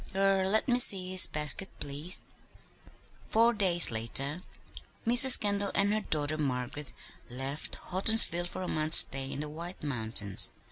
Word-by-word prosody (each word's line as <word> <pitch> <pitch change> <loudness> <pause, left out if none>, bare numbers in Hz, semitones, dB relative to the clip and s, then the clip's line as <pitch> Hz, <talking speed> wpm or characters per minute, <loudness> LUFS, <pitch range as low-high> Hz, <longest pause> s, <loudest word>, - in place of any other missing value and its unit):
Er 195 -1 0
let 220 +2 +1
me 245 -1 0
see 185 -6 +4
his 185 0 +6
basket, 150 +5 +1
please." 145 +6 -4 1.1
Four 230 +2 +2
days 180 - +1
later 135 +8 -3 0.6
Mrs. 245 +3 +6
Kendall 200 -1 -2
and 200 +1 0
her 215 - -3
daughter 155 -4 -2
Margaret 135 0 -6 0.4
left 135 +4 -7
Houghtonsville 185 -3 +2
for 185 - -9
a - - -7
month's 155 +1 +4
stay 135 0 +2
in 140 - -7
the 150 - -7
White 170 +4 -10
Mountains. 110 -7 -2
170 Hz, 145 wpm, -27 LUFS, 140-195 Hz, 1.1 s, his